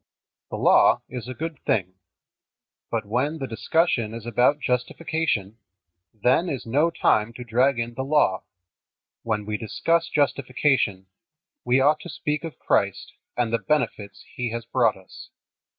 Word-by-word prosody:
The - - -4
Law - - +5
is 125 -1 -6
a 130 - -6
good 165 -1 -5
thing. 95 -4 0 1.0
But 115 -2 -2
when 130 +9 -1
the 135 - -4
discussion 115 - 0
is 115 -1 -8
about 125 +5 +2
justification, 125 - -1 0.5
then 125 - +1
is 135 -5 -4
no 145 +8 +2
time 115 -9 +1
to 125 - -8
drag 125 +3 +2
in 115 0 -3
the 130 - -4
Law. 135 -9 +2 0.8
When 105 -3 -2
we 105 0 -2
discuss 165 +10 0
justification 130 -8 +1 0.6
we 125 +2 +3
ought 150 +3 +4
to 175 - -9
speak 150 0 -3
of 160 -5 -7
Christ - - 0 0.2
and 120 -2 0
the 115 - +2
benefits 105 -8 -2
He 120 -1 -2
has 115 +1 -5
brought 115 -3 +2
us. 95 - -13
125 Hz, 150 wpm, -24 LUFS, 110-150 Hz, 1.0 s, Law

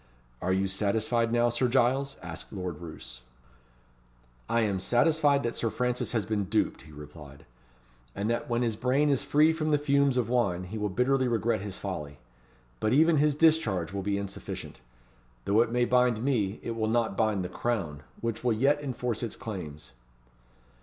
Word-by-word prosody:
"Are 95 - 0
you 95 +1 +1
satisfied 110 +4 0
now, 120 0 +3
Sir 120 +2 +1
Giles?" 135 +2 +1
asked 85 -1 -8
Lord 90 -5 -5
Roos. 80 -7 -10 1.3
"I 115 - +2
am 100 -4 0
satisfied 145 - +3
that 120 - -2
Sir 115 - -1
Francis 125 +1 -1
has 110 -4 0
been 105 -1 -1
duped," 105 +3 0
he 80 - -15
replied, 75 -1 -12 0.7
"and 100 +2 -2
that 120 +1 -1
when 120 +1 +1
his 115 -2 0
brain 130 +6 +2
is 140 0 +1
free 150 +3 +4
from 155 -1 -2
the 150 - +4
fumes 140 -2 +2
of 125 - +1
wine, 105 -8 +1
he 95 +5 -6
will 105 0 -1
bitterly 130 +6 +1
regret 115 -3 0
his 100 -2 -5
folly. 75 -8 -5 0.6
But 110 - +1
even 160 +3 +5
his 150 0 +3
discharge 115 - +2
will 100 - -2
be 100 +1 -1
insufficient. 100 -9 -6 0.6
Though 105 +3 +4
it 115 - +1
may 120 0 +2
bind 125 -2 +2
me, 110 -7 0
it - - -3
will 110 -1 -1
not 115 -3 +1
bind 105 -4 +1
the - - -2
Crown, 90 -11 -3 0.2
which 115 -1 -3
will 120 -2 +2
yet 140 +6 +2
enforce 125 -4 -3
its 115 -3 -4
claims." 80 - -7
115 Hz, 180 wpm, -28 LUFS, 95-125 Hz, 1.3 s, even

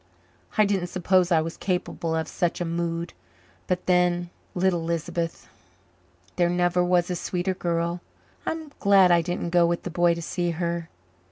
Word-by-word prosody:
"I 215 - +6
didn't 195 -3 0
suppose 185 0 +2
I 165 -2 +5
was 165 +1 -5
capable 180 -3 -2
of 160 -1 -1
such 175 -1 -1
a 175 - -1
mood. 170 0 -2 0.5
But 180 0 -1
then 175 -1 +2 0.2
little 180 -2 +1
Lisbeth. 165 0 -3 0.9
There 175 -1 +3
never 175 0 +2
was 180 0 +2
a - - -1
sweeter 180 +2 -2
girl. 170 -1 -1 0.4
I'm 320 -2 -4
glad 195 -3 +6
I 170 -1 +5
didn't 175 0 -3
go 175 -1 +5
with 170 0 -1
the 180 - -5
boy 175 0 +3
to 170 - -5
see 175 +1 -1
her. 170 -1 -2
175 Hz, 165 wpm, -25 LUFS, 170-180 Hz, 0.9 s, I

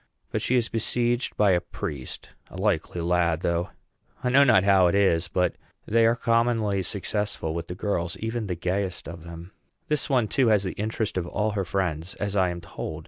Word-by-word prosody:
But - - -1
she 130 - +1
is 120 -2 +2
besieged 120 +2 0
by 105 -2 +4
a 90 -1 +3
priest 70 -6 -6 0.2
a - - -10
likely 95 -3 0
lad 85 -1 +1
though. 85 +2 0 0.5
I 125 - +1
know 135 +3 +6
not 110 -8 +5
how 95 -2 +5
it 85 - +1
is, 90 -4 +3
but 90 +1 +1 0.3
they 115 +1 +4
are 115 - +3
commonly 115 -4 +1
successful 100 -2 -2
with 85 0 -4
the 90 - -6
girls, 90 -3 -2
even 115 -1 -3
the 90 - -2
gayest 90 +2 -2
of 85 0 -8
them. 85 +2 -10 0.4
This 150 -1 +1
one, 125 -5 +2
too, 130 +3 +2
has 105 -3 +4
the 95 - -2
interest 110 -1 -2
of 85 - -4
all 105 +4 -1
her 100 -2 -2
friends, 85 -1 -2
as 100 -1 -3
I 95 -2 +3
am 85 0 -5
told. 80 -1 -6
100 Hz, 200 wpm, -26 LUFS, 85-110 Hz, 0.5 s, know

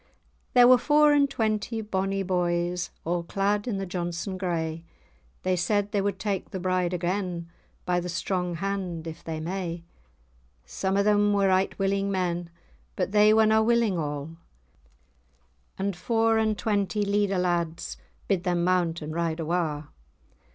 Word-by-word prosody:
There 245 -1 +8
were 255 0 +7
four 300 +2 +5
and 285 -1 +4
twenty 220 -2 -1
bonnie 195 -2 -1
boys, 175 -1 0 0.2
A' 175 +1 0
clad 200 +5 -1
in 215 -5 -1
the 195 - -3
Johnstone 175 +1 -3
grey; 165 -3 -2 0.6
They 185 0 +1
said 200 +3 0
they 200 - +1
would 200 -1 -1
take 195 -1 -3
the 190 - -5
bride 185 -1 0
again, 175 -1 -2 0.3
By 180 0 +1
the 180 0 -5
strong 180 0 -2
hand, 185 -2 -3
if 160 -1 -8
they 160 -1 -4
may. 170 0 -4 0.8
Some 190 - -1
o' 200 - +3
them 205 0 +3
were 200 -1 +3
right 190 +1 +1
willing 195 0 0
men, 175 -3 -1 0.5
But - - -1
they 210 0 +6
were 220 0 +5
na 220 0 +4
willing 225 -5 +2
a'; 145 +1 -4 1.4
And 195 0 -2
four 225 +4 +2
and 220 -1 +1
twenty 205 -1 0
Leader 200 -1 +1
lads 170 -2 -1 0.3
Bid 190 -3 +1
them 175 -2 0
mount 175 -3 +1
and 155 +1 -5
ride 165 -1 -1
awa'. 160 -2 -1
185 Hz, 155 wpm, -26 LUFS, 175-205 Hz, 1.4 s, There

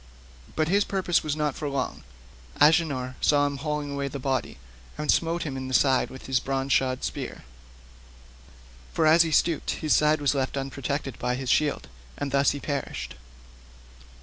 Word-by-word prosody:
But 155 0 +1
his 200 +4 +3
purpose 185 -4 +1
was 150 -2 -2
not 150 -2 0
for 150 +1 -4
long; 140 -1 -3 0.6
Agenor 145 -5 +3
saw 145 -1 +4
him 140 -1 -2
haling 150 -1 -3
the 140 - -5
body 130 -2 -1
away, - - -20 0.4
and 150 - +1
smote 170 +1 +1
him 145 -4 -4
in 130 0 -5
the 130 - -1
side 135 -2 +3
with 130 - -11
his 130 -1 +1
bronze 135 0 -1
shod 130 -1 +1
spear—for - - -8
as 160 +2 +7
he 165 - +2
stooped 160 +1 +1 0.2
his 155 - +4
side 150 +1 +3
was 145 -1 +2
left 135 0 -1
unprotected 135 0 -3
by 125 0 0
his 130 0 -2
shield—and 65 - -2
thus 140 0 +4
he 145 - -2
perished. 135 - -4
140 Hz, 165 wpm, -26 LUFS, 125-150 Hz, 0.6 s, as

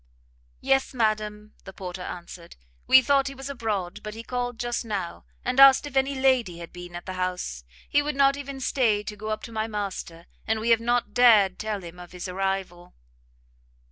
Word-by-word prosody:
"Yes, 270 0 +1
madam," 215 -2 -1
the 190 - -10
porter 180 -1 -7
answered; 175 -1 -8 0.3
"we 260 0 +8
thought 275 +1 +3
he 275 - -6
was 270 +1 -6
abroad, 210 -8 -3
but 210 0 -7
he 225 - -7
called 245 -1 -3
just 240 0 -2
now, 200 -6 -4 0.2
and 250 +2 0
asked 275 +1 +8
if 290 -2 -8
any 270 +1 +2
lady 255 -9 +2
had 170 -1 -10
been 175 -1 -9
at 175 - -7
the 185 - -5
house. 180 - -3 0.2
He 290 - +3
would 295 0 -3
not 275 0 +4
even 280 -1 -7
stay 225 -6 +1
to 210 - -6
go 215 +1 -6
up 215 - -3
to 235 - -8
my 220 0 -2
master, 195 -5 -5 0.2
and 220 0 +1
we 230 +2 +1
have 230 0 +5
not 240 +1 0
dared 215 -6 +5
tell 215 -3 -3
him 175 +1 -10
of 175 0 -11
his 180 +1 -6
arrival." 185 -1 -3
215 Hz, 200 wpm, -26 LUFS, 185-255 Hz, 0.3 s, we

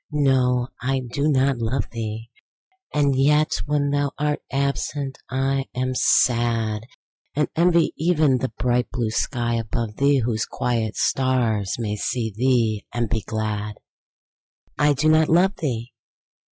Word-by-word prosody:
—no! 130 -4 +2
I 135 +1 0
do 130 +4 -2
not 135 -3 +2
love 115 0 -1
thee! 115 0 -5 0.6
And 140 -2 +2
yet 150 +3 +2
when 145 -1 +1
thou 145 0 +1
art 150 0 -1
absent 140 0 -2
I 135 +1 0
am 130 +1 -1
sad; 115 -3 +2 0.5
And 150 +1 +1
envy 170 0 +3
even 155 -5 +3
the 130 0 -2
bright 125 0 +1
blue 120 -3 -2
sky 120 0 -1
above 115 -1 -3
thee, 140 0 +3
Whose 115 -3 -1
quiet 115 -3 -2
stars 120 -7 +1
may 105 -3 -2
see 110 +1 -2
thee 115 -3 +1
and 120 -3 -2
be 110 -2 0
glad. 105 -1 -3 1.0
I 145 0 +3
do 140 +3 0
not 155 0 +4
love 185 +4 +3
thee! 120 -6 -3
125 Hz, 140 wpm, -23 LUFS, 115-140 Hz, 1.0 s, not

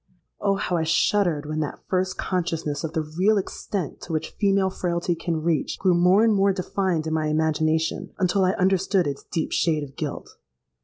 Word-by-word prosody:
Oh! 200 -1 +1
how 180 -3 -1
I 160 - 0
shuddered 165 -1 +2
when 155 +1 -3
that 150 -2 -4
first 185 0 0
consciousness 165 -5 -2
of 160 0 -4
the 160 -2 0 0.2
real 210 +3 +4
extent 190 -3 -4
to 170 - -6
which 155 - -2
female 195 -2 +1
frailty 175 -1 -1
can 165 -1 -3
reach, 165 -3 0
grew 185 -2 +3
more 180 +4 +5
and 225 -1 +4
more 200 0 +3
defined 185 -3 -1
in 160 - -2
my 155 -1 0
imagination, 160 +1 0
until 190 0 +2
I 185 +1 +3
understood 190 -1 +2
its 140 -1 -3
deep 165 -3 -3
shade 155 -4 +1
of 135 -1 -10
guilt. 150 -3 -6
175 Hz, 190 wpm, -24 LUFS, 160-190 Hz, 0.2 s, more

